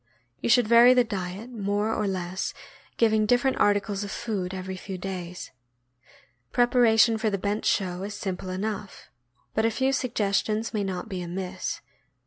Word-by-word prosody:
You - - -2
should 235 -1 +5
vary 235 +2 +7
the 250 - +5
diet 200 +1 -5
more 205 0 -1
or 210 - -1
less, 185 -1 -3 0.4
giving 220 -2 +3
different 245 +3 +2
articles 205 0 +1
of 200 - -5
food 200 -4 -3
every 190 0 -5
few 190 0 -6
days. 180 -1 -6 1.0
Preparation 235 -2 +4
for 220 0 +1
the 200 - -1
bench 205 +3 -2
show 185 -2 0
is 200 +1 -5
simple 190 -2 -4
enough, 200 +1 -5 0.4
but 220 - +1
a 225 - +4
few 265 +4 0
suggestions 220 -2 0
may 210 -2 0
not 185 -2 -4
be 185 -2 -4
amiss. 180 +1 -4
205 Hz, 155 wpm, -26 LUFS, 190-225 Hz, 1.0 s, vary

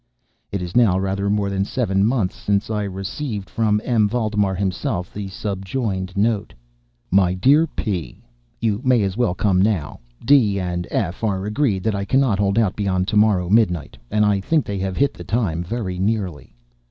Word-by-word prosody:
It 100 -2 -2
is 90 +1 -7
now 110 -7 +4
rather 95 +1 -1
more 100 -1 0
than 95 0 0
seven 100 -3 0
months 110 -4 +1
since 100 +2 -1
I 105 -1 -1
received, 100 +2 -5
from 105 -2 +1
M. 110 -4 +2
Valdemar 105 -4 0
himself, 95 -1 -2
the 100 -1 -5
subjoined 95 -1 -3
note: 110 0 0 0.6
MY 90 -1 +3
DEAR 140 - +4
P——, 90 - -4 0.4
You 110 -1 0
may 125 -5 +3
as 95 -1 -1
well 115 -6 +1
come 95 -2 +2
now. 95 -8 0 0.3
D—— 115 -9 +4
and 90 -1 -3
F—— 95 0 -2
are 100 -3 -1
agreed 105 -4 0
that 110 - +1
I 100 0 -2
cannot 130 -4 +2
hold 100 0 +1
out 110 -5 +2
beyond 95 -2 0
to - - -2
morrow 105 -4 +3
midnight; 90 -7 +2
and 105 0 +2
I 100 -1 +2
think 155 +9 +1
they 100 -1 -3
have 95 0 -3
hit 140 0 +2
the - - -10
time 95 -8 -1
very 95 -2 -4
nearly. 95 -6 -2
100 Hz, 180 wpm, -21 LUFS, 95-110 Hz, 0.6 s, now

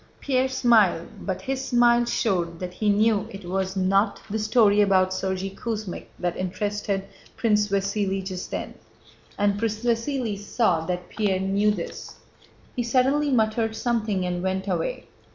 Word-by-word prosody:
Pierre 260 -1 +1
smiled, 230 -9 +3 0.2
but 190 -2 -3
his 270 0 -2
smile 240 -2 +4
showed 175 -8 0
that 180 -1 -5
he 210 +2 0
knew 210 0 +3
it 195 -3 -9
was 190 +1 -2
not 195 +3 +2
the 220 - -1
story 215 -1 +4
about 190 -2 +3
Sergéy 190 0 -2
Kuzmích 215 -3 -5
that 175 -1 -2
interested 200 +1 -2 0.3
Prince 210 -3 +2
Vasíli 195 -1 -1
just 185 -1 -5
then, - - -4 0.6
and 205 0 +1
Prince 220 0 -2
Vasíli 235 -2 0
saw 205 -5 +1
that 180 0 -3
Pierre 200 -4 0
knew 195 +2 +2
this. 190 -5 -4 0.6
He 245 - 0
suddenly 265 +5 +2
muttered 225 -2 +1
something 220 -5 0
and 175 0 -2
went 190 +1 -2
away. - - -2
205 Hz, 150 wpm, -25 LUFS, 190-230 Hz, 0.6 s, smile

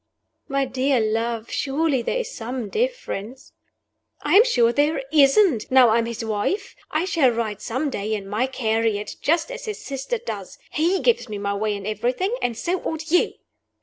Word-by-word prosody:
"My 275 -1 0
dear 260 0 +1
love, 225 +1 -1
surely 280 -1 0
there 235 - -1
is - - -3
some 240 -1 -4
difference 435 - -3 0.3
" - - -56 0.3
"I'm 420 - +6
sure 240 - +3
there 290 0 +1
isn't, 285 - +4
now 255 -2 +6
I 225 +2 +4
am 230 - -1
his 235 0 -4
wife. 220 - -2
I 315 +3 0
shall 325 -8 +3
ride 225 -3 -2
some 270 +5 -2
day 215 -1 -2
in 200 -2 -6
my 215 +6 0
carriage, 225 -4 -1
just 330 +9 +1
as - - -7
his 430 -2 -4
sister 275 - -3
does. 475 +2 -7
He 345 +5 +1
gives 465 - +2
me 210 - -4
my 200 0 -2
way 210 +1 -1
in 200 -1 -7
everything; 250 - -1
and 235 -2 -1
so 355 +6 -1
ought 320 0 -4
you." 355 - +3
260 Hz, 180 wpm, -23 LUFS, 220-325 Hz, 0.3 s, I'm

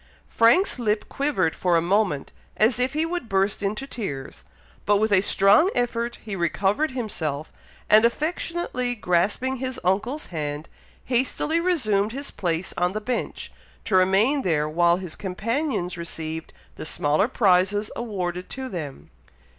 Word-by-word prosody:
Frank's 245 +7 +3
lip 215 -2 0
quivered 280 - 0
for 175 -2 +2
a - - +4
moment, 180 -4 0 0.3
as 230 +3 +3
if 255 +1 +1
he 310 +2 +1
would 340 -8 -4
burst 195 +1 +1
into 210 +6 -2
tears, 140 - -6 0.4
but 205 0 +5
with 215 +1 +1
a 190 -2 +5
strong 205 - +5
effort 235 -1 -1
he 210 -3 -4
recovered 195 - +1
himself, 165 - -4 0.4
and 215 +1 +6
affectionately 280 -1 -1
grasping 205 +7 0
his 260 0 -4
uncle's 210 +11 0
hand, 150 0 -4 0.4
hastily 265 +6 +1
resumed 220 - +1
his 280 +2 -6
place 175 -1 -2
on 180 +1 0
the 215 - -2
bench, 245 +3 -4 0.3
to 195 - 0
remain 195 +10 +4
there 155 - +1
while 170 +2 +3
his 180 -4 -6
companions 200 - -2
received 160 -1 -5 0.3
the - - -6
smaller 150 +8 +1
prizes 205 -2 +2
awarded 180 -6 -4
to 265 -1 -6
them. 155 - -7
205 Hz, 145 wpm, -24 LUFS, 175-250 Hz, 0.4 s, and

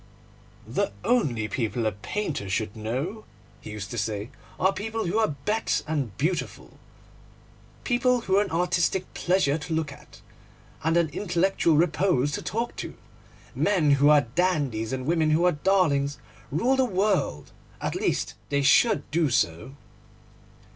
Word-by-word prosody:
'The - - -1
only 135 - +1
people 115 +1 -2
a 110 - +2
painter 110 - -4
should 100 +1 -2
know,' 130 - -4 0.4
he - - -9
used 105 0 -6
to 120 - -3
say, 105 +3 -3 0.3
'are 190 +1 +3
people 220 +2 -3
who 190 +6 0
are 215 -10 +1
bête 220 +2 0
and 140 -11 -2
beautiful, 170 +5 -3 1.0
people 250 0 +2
who 190 -3 0
are - - +5
an 200 - -6
artistic 180 +2 0
pleasure 175 -5 +1
to 160 +2 -3
look 160 -3 -1
at - - -15 0.6
and 165 +2 +2
an 170 -1 +3
intellectual 175 -1 +1
repose 160 -4 +2
to - - -3
talk 230 +4 -3
to. - - -6 0.6
Men 175 -8 +2
who 140 +1 +5
are 150 -1 +7
dandies 135 -5 -1
and 130 -1 -3
women 160 0 +2
who 160 +3 +3
are 180 - +5
darlings 150 -5 +1 0.3
rule 235 - +2
the 265 - +3
world, 195 - 0 0.3
at - - -2
least - - -1 0.2
they 140 -1 +1
should 220 - +4
do 160 -1 +2
so. 85 +2 -1
160 Hz, 150 wpm, -26 LUFS, 130-190 Hz, 1.0 s, are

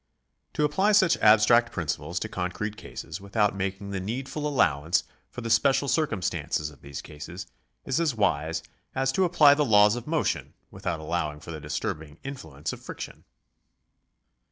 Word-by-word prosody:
To 150 - 0
apply 190 +8 +2
such 185 -5 +5
abstract 110 +2 +5
principles 85 -5 -3
to - - -2
concrete 95 +4 -3
cases 90 -4 -8
without 105 +1 +1
making 95 +1 -3
the 95 - -2
needful 135 +9 -3
allowance 80 - +2 0.3
for 125 - -8
the 115 - -4
special 135 +5 +3
circumstances 100 - -1
of 70 - -18
these 70 -1 -7
cases 80 +5 -8 0.4
is 135 +3 0
as 160 -7 +1
wise 80 -6 0 0.3
as 135 0 +1
to 185 +7 +2
apply 160 -5 +6
the 150 +1 +2
laws 105 -3 +5
of 120 +2 -7
motion 160 0 -1 0.2
without 80 - -3
allowing 80 -2 -2
for 80 +2 -9
the 80 -2 -7
disturbing 75 +1 -4
influence 80 - -6
of - - -9
friction. - - -8
105 Hz, 155 wpm, -27 LUFS, 80-135 Hz, 0.4 s, apply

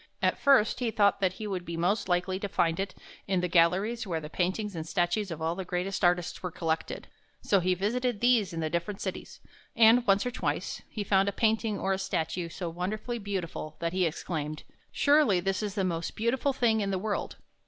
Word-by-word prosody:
At - - +1
first 270 -7 +4
he 245 -2 0
thought 205 -2 +3
that 185 -2 +2
he 215 - -7
would 190 -4 -3
be 170 -1 -5
most 185 +4 0
likely 180 +1 0
to 205 - -3
find 165 -2 +1
it 195 -1 -3 0.3
in 190 -2 +1
the 180 - 0
galleries 185 +7 +2
where 165 -3 -1
the 150 0 -9
paintings 190 +3 -1
and 160 - -3
statues 180 +4 0
of 160 -2 -5
all 165 +1 +1
the 190 +2 -5
greatest 180 +2 -3
artists 175 -1 +1
were 180 - -3
collected. 165 -2 -3 0.4
So 200 - +3
he 180 +1 +1
visited 235 +4 -1
these 240 -5 +3
in 165 -1 -4
the 155 - -1
different 170 +4 -2
cities, - - -6 0.3
and 230 +2 +6
once 195 +2 +4
or 250 - -1
twice 245 - -3
he 215 - -4
found 195 0 +3
a - - -2
painting 220 0 +1
or 195 - 0
a 190 - -2
statue 180 -2 -2
so 175 +1 -5
wonderfully 210 +8 -3
beautiful 185 -6 -4
that 170 0 -2
he 185 -2 +2
exclaimed: 155 -1 -4 0.2
" - - -35
Surely 285 -10 +4
this 195 +2 -1
is 205 -2 -3
the 195 - 0
most 170 -2 -2
beautiful 245 +5 +1
thing 230 -4 +2
in 200 - -1
the 190 - 0
world! 205 +2 -3
190 Hz, 215 wpm, -29 LUFS, 175-215 Hz, 0.4 s, and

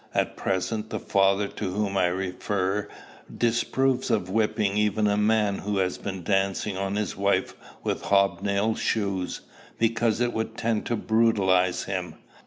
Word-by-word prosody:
At - - 0
present, 105 +3 -2
the - - -3
father 100 0 +2
to 100 -2 -4
whom 100 -1 -1
I 95 -2 +3
refer 95 +2 -1 0.5
disapproves 125 +3 +1
of 100 -6 0
whipping 105 -1 +1
even 105 0 +2
a 100 -1 +3
man 105 -1 +2
who 105 0 -2
has 90 -1 0
been 95 -2 -5
dancing 95 +1 0
on 95 +1 -2
his 105 -3 -2
wife 100 -1 0 0.3
with - - -1
hob 100 -1 +3
nailed 100 +2 0
shoes, 100 -4 -1 0.4
because 115 0 +1
it 120 0 +1
would 110 0 -3
tend 115 -2 -1
to 120 - 0
brutalize 100 -5 +2
him. - - -4
100 Hz, 155 wpm, -26 LUFS, 95-110 Hz, 0.5 s, I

